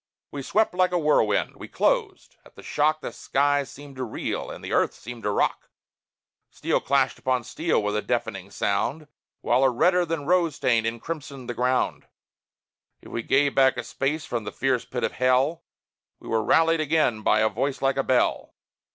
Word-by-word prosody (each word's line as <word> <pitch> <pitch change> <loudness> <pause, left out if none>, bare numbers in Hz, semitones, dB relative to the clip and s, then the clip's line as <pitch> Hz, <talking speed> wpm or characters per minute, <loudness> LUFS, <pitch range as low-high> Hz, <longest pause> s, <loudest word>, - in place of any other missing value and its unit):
We 140 - -5
swept 215 +10 +1
like 180 0 +2
a 180 - +1
whirlwind; 150 -10 +1
we - - -9
closed; - - -1
at - - -20
the - - -13
shock 155 +1 +1
The - - -6
sky 145 +1 +1
seemed 140 0 -12
to 130 - -3
reel 115 - -4
and - - -9
the - - -6
earth - - +2
seemed 120 +1 -9
to 105 - -1
rock; 100 - 0 0.8
Steel - - -1
clashed 135 -1 +1
upon 130 -2 0
steel 155 +1 -1
with 105 0 -1
a 105 - 0
deafening - - -3
sound, 155 +1 -1 0.3
While 125 +3 +2
a 135 - +5
redder 180 +9 +3
than 165 -3 -3
rose 170 -2 +2
stain 115 -3 +1
encrimsoned 130 +2 -6
the 120 - -3
ground; 125 +2 0 1.0
If - - -12
we 115 - -2
gave 140 +4 +2
back 130 -1 +4
a 120 - -3
space 145 +5 -2
from 120 -2 -3
the - - -5
fierce 130 -2 0
pit 125 - -4
of - - 0
hell, 130 +7 +1 0.5
We - - -13
were 110 -1 +1
rallied 165 +4 +3
again 150 -8 +1
by 110 0 +3
a 110 - +4
voice 135 +3 -2
like 135 0 +1
a 135 - +1
bell. 130 -1 0
135 Hz, 190 wpm, -25 LUFS, 120-155 Hz, 1.0 s, a